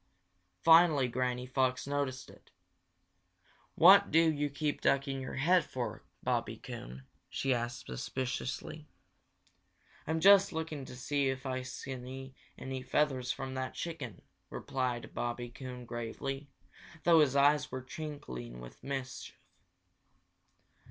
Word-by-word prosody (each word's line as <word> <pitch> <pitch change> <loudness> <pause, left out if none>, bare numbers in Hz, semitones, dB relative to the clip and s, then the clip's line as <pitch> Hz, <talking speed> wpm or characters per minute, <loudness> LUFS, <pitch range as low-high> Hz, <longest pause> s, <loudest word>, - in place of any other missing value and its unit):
Finally 160 -5 +7
Granny 125 0 -1
Fox 130 0 0
noticed 140 -2 -2
it. - - -19 1.3
"What 200 +4 +8
do 165 0 +5
you 145 -1 -1
keep 145 +1 -2
ducking 135 -1 +1
your 130 - -5
head 175 +6 +4
for, 125 -2 -4 0.2
Bobby - - -1
Coon?" 65 +2 -9 0.2
she 135 -1 0
asked 120 0 -3
suspiciously. 130 - -4 1.2
"I'm 160 +1 0
just 195 +2 +7
looking 160 -4 -4
to 125 - -9
see 140 +2 0
if 130 0 -4
I 130 -1 -1
can 130 - -7
see 130 0 -7 0.2
any 130 0 -5
feathers 130 -2 +1
from 135 -1 -5
that 130 0 -4
chicken," 145 - -6 0.3
replied 125 -2 -3
Bobby 120 0 -3
Coon 125 -1 -8
gravely, 135 +4 -5 0.5
though 170 -2 +6
his 140 -3 +4
eyes 145 +2 +4
were 130 0 -4
twinkling 65 - -7
with - - -12
mischief. 135 -1 -5
130 Hz, 125 wpm, -32 LUFS, 125-145 Hz, 1.3 s, What